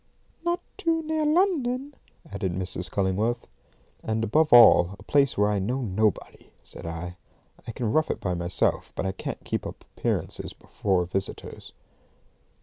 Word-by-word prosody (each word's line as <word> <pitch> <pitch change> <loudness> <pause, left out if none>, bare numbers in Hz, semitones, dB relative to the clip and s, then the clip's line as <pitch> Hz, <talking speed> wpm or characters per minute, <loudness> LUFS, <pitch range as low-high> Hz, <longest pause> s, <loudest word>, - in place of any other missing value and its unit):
"Not 345 0 0 0.2
too 330 -4 0
near 310 -1 0
London," 290 -6 +1 0.4
added 95 -3 -2
Mrs. 90 0 -3
Cullingworth. 105 +5 0 0.6
"And, 110 0 -1
above 150 +8 +2
all, 110 -6 +8
a - - -14
place 140 -2 +2
where 105 +1 +3
I 105 - +1
know 125 +8 -1
nobody," 105 0 -1
said - - -7
I. 85 +2 -6 0.5
"I - - -3
can 115 -1 -2
rough 155 0 +2
it - - -2
by 90 - -1
myself, 85 0 0
but - - -2
I 95 - 0
can't 95 - -6
keep - - -2
up - - -10
appearances - - -2
before 95 -3 -1
visitors." 95 +2 -5
110 Hz, 150 wpm, -26 LUFS, -, 0.6 s, all